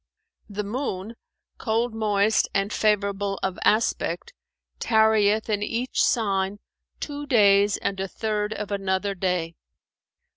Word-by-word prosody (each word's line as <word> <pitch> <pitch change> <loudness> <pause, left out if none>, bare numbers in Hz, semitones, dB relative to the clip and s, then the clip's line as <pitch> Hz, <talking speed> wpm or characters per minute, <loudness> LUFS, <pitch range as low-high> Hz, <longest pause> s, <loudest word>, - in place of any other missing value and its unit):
The 210 +1 -4
Moon, 210 -2 -4 0.5
cold 230 +1 0
moist 215 -1 +2
and 195 +1 0
favourable 200 -2 0
of 190 -1 -2
aspect, 230 - 0 0.5
tarrieth 220 -1 +3
in 210 -2 -1
each 235 +4 -1
Sign 200 -4 +1 0.4
two 290 -1 -5
days 205 -4 +4
and 195 -1 -3
a 195 - -2
third 210 +1 -2
of 210 -1 -5
another 195 0 -1
day. 180 -3 -1
205 Hz, 115 wpm, -24 LUFS, 195-220 Hz, 0.5 s, days